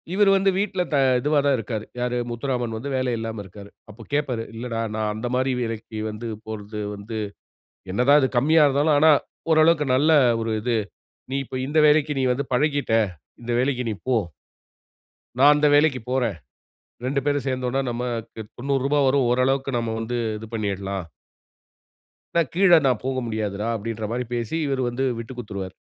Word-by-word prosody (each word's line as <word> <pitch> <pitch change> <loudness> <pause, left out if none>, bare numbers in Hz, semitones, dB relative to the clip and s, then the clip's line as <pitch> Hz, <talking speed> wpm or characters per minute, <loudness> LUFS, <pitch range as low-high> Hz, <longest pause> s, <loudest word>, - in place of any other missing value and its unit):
இவரு 200 +1 +4
வந்து 195 0 +3
வீட்ல 195 -2 0
த - - +4 0.2
இதுவா 150 +3 +2
தான் 140 -1 +4
இருக்காரு. 110 -1 -4 0.2
யாரு 125 0 -1
முத்துராமன் 120 -1 -2
வந்து 135 +6 -5
வேலை 130 -1 0
இல்லாம 115 -1 -4
இருக்காரு. 100 +2 -12 0.2
அப்போ 110 +2 -12
கேட்பாரு, 130 -6 0
"இல்லடா 115 0 -4 0.2
நான் 110 -1 -1
அந்த 110 +3 -4
மாதிரி 130 +1 +1
வேலைக்கு 115 -1 -5
வந்து 110 +2 -6 0.2
போறது 105 -1 -6 0.2
வந்து 100 +3 -7 0.8
என்னதா 125 +8 +4
அது 130 - +2
கம்மியா 155 +6 +4
இருந்தாலும் 145 +2 +3
ஆனா, 155 +1 +6 0.4
ஓரளவுக்கு 155 -1 +4
நல்ல 150 +5 +4 0.3
ஒரு 115 0 -2
இது. 120 +1 0 0.5
நீ 135 - -1
இப்போ 130 - -7
இந்த 150 +3 0
வேலைக்கு 150 0 +3
நீ - - +1
வந்து 135 +3 -2
பழகிட்டா. 140 -4 +2 0.4
இந்த 120 +1 -3
வேலைக்கு 130 -1 0
நீ - - -2
போ!" 130 - +3 1.2
நான் 145 +2 +8
அந்த 150 0 +3
வேலைக்குப் 145 -6 +2
போறேன். 125 -5 +1 0.7
2 140 +2 0
பேரும் 145 -2 0
சேர்ந்தோம்னா, 130 0 -1
நமக்கு 120 -2 -4 0.2
ரூ.90 140 +2 0
வரும். 135 0 +3
ஓரளவுக்கு 135 +2 +1
நம்ம 115 -1 -2
வந்து 115 +2 -3 0.2
இது 110 - -9
பண்ணிறலாம். 100 -3 -3 1.3
"நான் 165 -5 +2
கீழ 195 +1 +4 0.2
நான் 125 -4 +1
போக 130 0 -1
முடியாதுடா." 105 -1 -3
அப்படின்ற 110 0 -5
மாரி 125 +1 -2
பேசி, 120 +4 -3
இவுரு 135 -1 -1
வந்து 125 +3 -2
விட்டுக் 120 +2 -8
குடுத்துடுவாரு. 100 -5 -6
125 Hz, 160 wpm, -23 LUFS, 115-140 Hz, 1.3 s, நான்